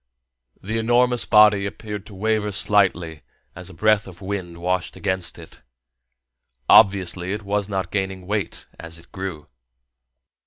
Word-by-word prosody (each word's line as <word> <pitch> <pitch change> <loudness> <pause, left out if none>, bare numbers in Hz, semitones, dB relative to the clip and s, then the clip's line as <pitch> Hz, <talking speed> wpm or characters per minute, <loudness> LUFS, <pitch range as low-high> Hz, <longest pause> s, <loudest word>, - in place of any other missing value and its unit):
The 110 +4 -2
enormous 120 +1 +2
body 105 -2 +5
appeared 105 0 -7
to 105 - -12
waver 105 +1 0
slightly 90 -6 +1 0.3
as 90 0 -9
a - - -12
breath 110 +2 +2
of 90 -2 -12
wind 95 -3 -5
washed 90 +1 -2
against 95 -3 -2
it: - - -14 1.1
obviously 95 -3 +4
it 105 +1 -5
was 100 0 -2
not 95 -3 -3
gaining 95 -2 -3
weight 105 0 -3
as 85 0 -9
it 85 - -18
grew. 95 -6 -6
95 Hz, 140 wpm, -22 LUFS, 90-105 Hz, 1.1 s, body